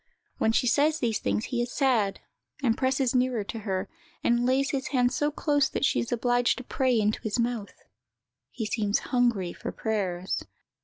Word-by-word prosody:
When 220 - +3
she 230 - +2
says 295 +6 +3
these 230 -5 0
things, 215 - -1
he 245 -2 -1
is 240 0 -3
sad, 235 -8 +1 0.4
and 230 -4 +3
presses 260 -1 +1
nearer 250 -3 +1
to 225 +3 -6
her, 195 -2 -2 0.4
and 240 +1 +2
lays 270 +2 +2
his 270 -2 -2
head 250 -2 +2
so 295 +3 +1
close 290 -1 +1
that - - 0
she - - +2
is 235 - -3
obliged 245 0 +2
to 255 - -6
pray 255 -2 +1
into 215 0 0
his 220 0 -2
mouth. 235 -3 -2 0.8
_He 220 - 0
seems 210 -1 +1 0.2
hungry 235 -8 +2
for - - -6
prayers. 190 -5 -2
240 Hz, 185 wpm, -27 LUFS, 215-260 Hz, 0.8 s, When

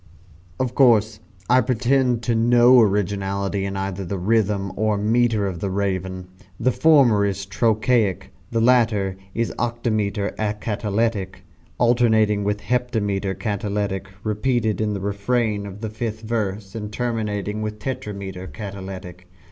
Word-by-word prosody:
Of 130 -2 -1
course 115 -5 +4 0.3
I 125 +2 +5
pretend 125 0 +1
to 120 - +1
no 120 +2 +6
originality 100 -1 0
in 100 0 -3
either 95 0 -3
the 95 +2 -4
rhythm 100 0 +1
or 110 0 +1
metre 110 0 +2
of 95 -3 -3
the 100 - -2
"Raven." 95 -1 -2 0.3
The 130 - +2
former 130 -9 +4
is 100 -1 -1
trochaic 110 0 +1 0.2
the 115 -1 0
latter 110 -6 +3 0.2
is 115 0 -1
octametre 110 -4 -1
acatalectic, 105 -1 -2 0.3
alternating 110 -4 +3
with 105 +1 -1
heptametre 105 -4 -1
catalectic 100 -1 -2 0.2
repeated 110 0 0
in 105 -1 0
the 100 - -4
refrain 100 +1 -1
of 100 +1 -10
the 110 - -3
fifth 110 0 -4
verse, 105 -3 -3
and 105 -2 -5
terminating 105 -3 -2
with 105 0 -4
tetrametre 100 -5 -6
catalectic. 95 -3 -8
105 Hz, 130 wpm, -22 LUFS, 100-115 Hz, 0.3 s, no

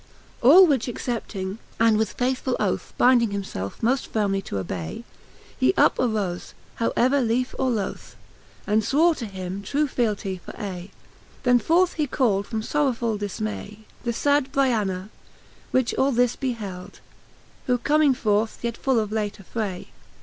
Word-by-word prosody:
XLIV. 240 - +5
All 370 +6 +10
which 275 -8 +1
accepting, 220 -5 -4 0.2
and 225 -1 +5
with 215 -1 0
faithfull 255 0 -1
oth 200 -3 -1
Bynding 245 -2 +5
himfelfe 145 - -5
moft 255 +3 +1
firmely 195 -3 0
to - - -5
obay, 90 -3 -4 0.5
He 130 0 +2
up - - +4
arofe, 210 -7 -1 0.2
how 230 - 0
ever 265 +3 +3
liefe 250 +2 0
or 265 - +2
loth. 215 -5 -3 0.5
And 215 +1 +2
fwore 315 +9 +3
to 230 - -5
him 190 0 -6
true 290 +8 0
fealtie 210 -7 -2
for - - -11
aye. 185 -2 -5 0.5
Then 245 -1 +5
forth 340 +9 +3
he 300 -2 -1
cald 210 -7 +1
from 220 -2 -3
forrowfuU 240 -6 0
difmay" 210 +1 -5 0.2
The 240 - 0
fad 285 +2 +1
Br'tana^ 210 -8 0 0.6
which 255 -2 +1
all 275 +1 +2
this 245 -1 +2
beheld; 210 -8 -5 0.7
Who 250 -1 +3
comming 290 +1 +3
forth 215 -2 0
yet 235 -1 -2
full 265 -4 +1
of 215 -1 -2
late 210 -2 -2
affray 195 -1 -5
225 Hz, 155 wpm, -24 LUFS, 200-260 Hz, 0.7 s, All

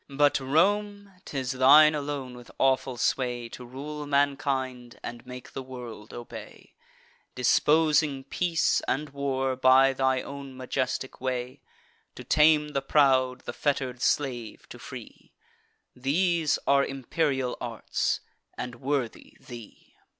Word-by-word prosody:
But, 145 +1 +3
Rome, 200 +8 +1
'tis 130 -3 -3
thine 145 +4 +7
alone, 140 -4 -4
with 120 -1 -13
awful 130 -1 +1
sway, 120 -1 -1
To 125 - -9
rule 145 +4 -7
mankind, 135 -3 -1
and 120 0 -7
make 125 0 -10
the - - -4
world 120 -5 -9
obey, 120 - -10 0.6
Disposing 150 +2 +3
peace 165 +4 +1
and 145 +2 -1
war 135 -2 -1
by 130 +1 +5
thy 130 -1 +1
own 140 -2 -9
majestic 130 0 -3
way; 125 -1 -3 0.5
To - - -9
tame 150 -1 +4
the 140 -2 -1
proud, 130 -3 +3
the - - -6
fetter'd 130 -4 -1
slave 125 -3 -1
to - - -10
free: - - -11 0.6
These 160 +4 +1
are 140 0 +4
imperial 135 -1 -1
arts, - - -2 0.4
and 120 -1 -6
worthy 135 -3 -3
thee." 120 -4 -12
135 Hz, 120 wpm, -27 LUFS, 125-145 Hz, 0.6 s, thine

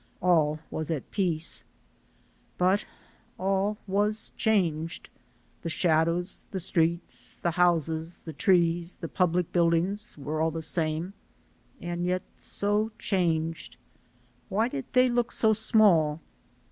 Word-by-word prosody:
All 160 -4 +3
was 155 0 -3
at 155 -5 -4
peace. 170 -5 0 0.9
But 185 +3 +2 0.5
all 195 +2 0
was 210 +2 +1
changed. 170 -8 0 0.5
The 165 - -4
shadows, 170 +2 0
the 195 - -4
streets, 170 -1 -1
the 170 - +2
houses, 165 -1 0
the 160 - -6
trees, 170 +1 +2
the 165 - -6
public 180 0 0
buildings 175 +4 +1
were 150 +2 -3
all 160 - +2
the 160 0 -4
same, 160 +2 0 0.7
and 175 0 -4
yet 180 +1 0
so 205 +2 -1
changed. 165 -4 -1 0.7
Why 215 +4 +1
did 135 - -5
they 255 0 +5
look 240 -1 0
so 220 -1 +3
small? 200 -9 +3
175 Hz, 120 wpm, -27 LUFS, 160-195 Hz, 0.9 s, they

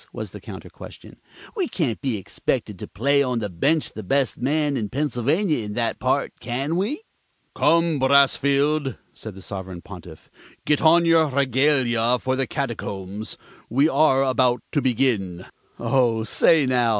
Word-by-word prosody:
was - - -7
the - - -10
counter - - -9
question. - - -13 0.4
"We 380 -6 -1
can't 140 - -2
be 130 -6 -1
expected 95 - -3
to - - -7
play 140 +6 +1
on 125 -3 0
the 105 -4 -3
bench 145 - 0
the 110 - -7
best 135 +7 0
man 145 +2 0
in 110 -5 -2
Pennsylvania 150 - 0
in 105 0 -6
that 115 +1 -2
part, - - 0
can 135 +7 -3
we?" 225 - -2 0.5
"Come, 165 0 +2
Brassfield," 140 +1 +2 0.2
said 110 -4 -9
the 95 - -11
Sovereign 95 -3 -7
Pontiff, 85 -4 -12 0.3
"get 150 -1 +2
on 170 +2 +5
your 165 -1 +4
regalia 130 -3 +2
for 130 +2 -2
the 130 -1 -1
Catacombs. 105 -7 -5 0.3
We 135 +6 +3
are 135 -4 +3
about 130 -2 +1
to 145 - +1
begin." 110 -8 0 0.3
"Oh, 120 -4 +1
say, 150 +6 +3
now!" 125 -2 +2
130 Hz, 155 wpm, -23 LUFS, 115-150 Hz, 0.5 s, on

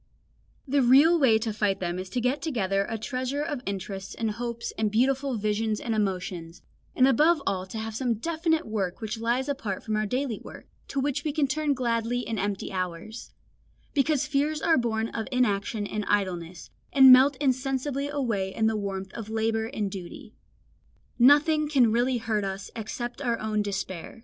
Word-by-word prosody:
The 275 +1 +2
real 285 +7 +6
way 240 -6 +5
to 220 -1 -3
fight 205 -2 0
them 175 0 -2
is 185 0 -6
to 245 - -2
get 250 +4 0
together 195 - 0
a 225 - -2
treasure 255 +5 -3
of 295 -5 -3
interests 195 0 -5
and 225 -2 -1
hopes 235 +1 -5
and 220 -1 0
beautiful 260 +3 +1
visions 215 +1 -1
and 230 - -2
emotions, 180 -4 -3 0.3
and 255 - +5
above 305 +6 +4
all 185 -1 -1
to 205 - -7
have 220 0 -4
some 240 0 0
definite 320 - 0
work 195 -5 -3
which 220 0 -4
lies 240 +4 0
apart 230 -9 -3
from 215 - -2
our 215 0 0
daily 250 0 -2
work, - - -11 0.2
to 275 - -3
which 275 0 -1
we 305 - -1
can 295 -1 +1
turn 290 +1 0
gladly 240 -1 0
in 225 -2 -3
empty 200 -1 -2
hours; 185 +4 -5 0.6
because 290 0 +2
fears 295 +1 0
are 330 +1 +3
born 230 -3 0
of 225 - -4
inaction 215 -3 0
and 210 +1 -3
idleness, 180 -4 -2 0.2
and 265 -2 +9
melt 265 +2 +6
insensibly 270 +1 -1
away 230 -10 -1
in 220 - +1
the 220 0 +2
warmth 195 -2 -4
of 225 -2 -7
labour 225 0 0
and 215 -6 -3
duty. 185 -3 -9 0.9
Nothing 295 +4 +5
can 255 -7 +4
really 245 +2 +2
hurt 220 -3 -1
us 195 0 -5
except 240 +3 -5
our 235 -4 0
own 215 -1 -1
despair. 195 -1 -5
230 Hz, 180 wpm, -27 LUFS, 205-270 Hz, 0.9 s, and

